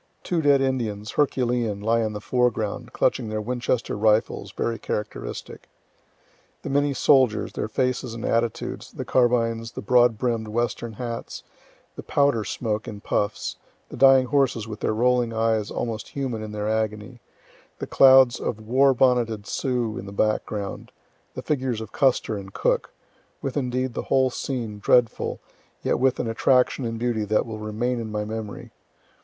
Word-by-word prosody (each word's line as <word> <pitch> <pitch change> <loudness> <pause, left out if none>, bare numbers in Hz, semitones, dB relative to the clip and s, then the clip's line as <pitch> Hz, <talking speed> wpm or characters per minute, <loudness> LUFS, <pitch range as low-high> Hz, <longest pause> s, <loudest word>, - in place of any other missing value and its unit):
Two 175 -2 0
dead 140 -2 +4
Indians, 110 -6 -2
herculean, 120 -7 0
lie 115 +3 +1
in 110 -1 -1
the 105 - -4
foreground, 120 0 -1
clutching 125 -3 0
their 110 0 -2
Winchester 120 +2 -1
rifles, 110 +1 +1
very 115 -2 -2
characteristic. 105 - -5 0.9
The - - -4
many 145 0 +1
soldiers, 130 -7 +3
their - - -3
faces 125 +1 -1
and 115 - -5
attitudes, 115 -1 -2
the - - -5
carbines, 115 -2 +1
the - - -6
broad 120 0 +4
brimm'd 115 -2 -1
western 115 +1 -2
hats, 115 +1 -6 0.5
the - - -7
powder 140 -6 +2
smoke 105 +1 -3
in 105 -1 -7
puffs, 105 0 -2 0.3
the - - -8
dying 135 -1 +6
horses 125 -5 +1
with 110 -1 -7
their - - 0
rolling 120 0 +2
eyes 110 -2 +1
almost 110 -3 -4
human 130 -5 -3
in 110 -1 -6
their 105 0 -3
agony, 110 +2 -2 0.6
the - - -4
clouds 130 -2 +6
of 110 - -3
war 130 +5 +3
bonneted 120 -5 +2
Sioux 120 -3 -2
in 95 - -8
the - - -7
background, 105 -1 -2 0.4
the - - -5
figures 130 -6 -1
of 110 -2 -8
Custer 130 -4 +1
and 95 -1 -9
Cook - - 0 0.5
with 135 - -3
indeed 130 -2 -1
the - - -3
whole 130 -1 +3
scene, 115 -6 -4
dreadful, 120 +2 +2 0.4
yet - - +1
with 130 0 +2
an - - -1
attraction 125 +3 +2
and 115 0 -3
beauty 115 -2 -1
that 105 +1 +1
will 110 -2 -6
remain 115 +4 -2
in 110 -2 -5
my 105 0 -2
memory. 110 -1 -6
115 Hz, 160 wpm, -24 LUFS, 110-125 Hz, 0.9 s, dying